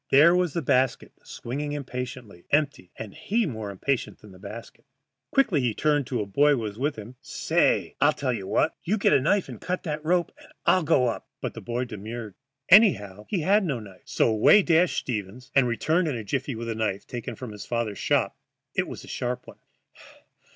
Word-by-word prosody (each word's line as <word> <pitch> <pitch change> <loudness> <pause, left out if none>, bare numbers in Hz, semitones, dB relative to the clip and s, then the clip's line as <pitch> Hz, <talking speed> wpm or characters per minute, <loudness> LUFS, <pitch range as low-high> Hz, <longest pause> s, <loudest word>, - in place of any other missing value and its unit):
There 155 +6 +6
was 180 -4 +1
the 170 - -2
basket 130 -1 +1
swinging 145 +5 -5
impatiently, 125 -8 -6
empty, 145 - 0
and 105 -3 -8
he 225 +2 0
more 110 - -5
impatient 120 +7 -2
than 105 - -15
the 95 - -15
basket. 105 +4 -10 0.5
Quickly 200 - +3
he 120 -4 0
turned 145 -4 +1
to 125 -4 -1
a - - -2
boy 145 +9 +3
who - - +1
was 110 -2 -5
with 145 +3 0
him. 110 +4 -10
"Say, - - +1
I'll 145 +2 +6
tell 140 -4 -2
you 100 -5 -5
what. 155 - +1
You 210 +6 0
get 195 - +3
a - - +4
knife 195 +7 +2
and - - -9
cut 180 0 -3
that 150 -2 -4
rope, 175 +2 +1
and - - -17
I'll 185 - +4
go 150 -5 +3
up." 115 - -3
But - - -4
the - - -8
boy 120 +1 -2
demurred. 110 0 -7 0.3
Anyhow, 105 - +5
he 190 -5 0
had 200 +6 +3
no 145 -9 -1
knife. 100 -4 -13
So - - +1
away 110 - +6
dashed 170 +1 +3
Stevens, 120 +2 -4
and 135 -3 +4
returned 160 +9 +1
in 145 - -1
a 115 - -5
jiffy 130 +5 -2
with 115 +1 -5
a - - -1
knife, 110 -3 -2
taken 120 -1 -6
from 125 0 -8
his 105 -1 -9
father's 115 -4 -2
shop. - - +1 0.4
It - - 0
was - - -8
a - - -13
sharp 125 0 -3
one. - - -14
125 Hz, 210 wpm, -26 LUFS, 110-155 Hz, 0.5 s, There